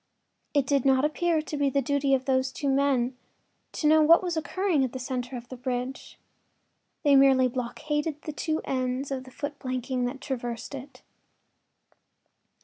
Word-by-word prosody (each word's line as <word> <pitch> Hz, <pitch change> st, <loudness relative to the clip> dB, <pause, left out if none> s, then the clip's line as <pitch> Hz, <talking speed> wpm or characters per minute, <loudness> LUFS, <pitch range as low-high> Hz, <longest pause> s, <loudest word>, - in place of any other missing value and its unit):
It 280 Hz, -2 st, +3 dB
did 275 Hz, -1 st, +2 dB
not 270 Hz, +1 st, +4 dB
appear 320 Hz, +1 st, +1 dB
to 300 Hz, -, -5 dB
be 285 Hz, -1 st, +2 dB
the 275 Hz, -, +1 dB
duty 275 Hz, +1 st, +2 dB
of 260 Hz, 0 st, -3 dB
these 260 Hz, -1 st, +1 dB
two 280 Hz, +1 st, -2 dB
men 270 Hz, -2 st, +2 dB, 0.6 s
to -, -, -3 dB
know 310 Hz, +1 st, +6 dB
what 330 Hz, +4 st, +6 dB
was 350 Hz, -2 st, -1 dB
occurring 335 Hz, -1 st, 0 dB
at 255 Hz, -, -2 dB
the -, -, -3 dB
center 255 Hz, 0 st, -4 dB
of 240 Hz, 0 st, -10 dB
the 255 Hz, -, -7 dB
bridge; 250 Hz, +1 st, -4 dB, 0.9 s
they 285 Hz, -2 st, +5 dB
merely 270 Hz, -1 st, +6 dB
blockaded 295 Hz, +5 st, -3 dB
the 305 Hz, -, -5 dB
two 315 Hz, +1 st, -2 dB
ends 255 Hz, +1 st, -2 dB
of 260 Hz, -1 st, -3 dB
the 260 Hz, -, -13 dB
foot 285 Hz, +2 st, -6 dB
planking 255 Hz, -1 st, -2 dB
that 260 Hz, +2 st, -4 dB
traversed 245 Hz, -3 st, -5 dB
it. 275 Hz, 0 st, -9 dB
270 Hz, 170 wpm, -27 LUFS, 255-295 Hz, 0.9 s, know